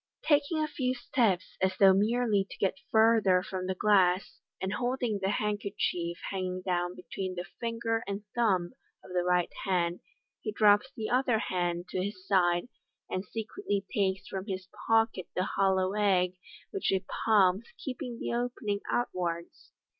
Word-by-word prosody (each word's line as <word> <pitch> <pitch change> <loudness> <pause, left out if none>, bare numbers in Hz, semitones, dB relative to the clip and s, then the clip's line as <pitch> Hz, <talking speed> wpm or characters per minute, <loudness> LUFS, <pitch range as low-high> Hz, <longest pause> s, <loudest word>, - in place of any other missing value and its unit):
Taking 295 +1 +2
a - - 0
few 255 -4 -1
steps, 235 -7 0
as 190 0 +1
though 195 -1 +7
merely 210 0 +2
to - - -10
get 195 +8 0
further 220 -5 +4
from 185 -1 -4
the 190 - -1
glass, 190 -2 +3 0.2
and 190 +1 -2
holding 245 -2 -1
the 190 - +1
hand 210 0 0
kerchief 170 -4 -2
hanging 185 -1 -3
down 175 -1 -1
between 185 0 -5
the 175 0 -4
finger 230 -1 -1
and 200 +1 -4
thumb 190 -7 +1 0.3
of 180 - -11
the 180 -1 +1
right 180 -1 +2
hand, 175 -2 0 0.4
he 215 - -3
drops 210 +4 +4
the 220 0 -3
other 250 -2 +3
hand 175 -3 -1
to 185 - -1
his 190 -1 -6
side, 175 -1 +2 0.4
and 185 +2 -2
secretly 215 - -3
takes 195 -2 0
from 190 +1 -5
his 185 -2 -4 0.2
pocket 225 -5 +2
the 180 - +1
hollow 190 -1 +1
egg, 190 -4 +2 0.4
which 395 -3 -2
he 190 -1 +1 0.2
palms, 200 -1 +4
keeping 250 -2 -5
the - - -3
opening 235 -4 -1
outwards. 175 -7 -2
195 Hz, 160 wpm, -30 LUFS, 185-225 Hz, 0.4 s, though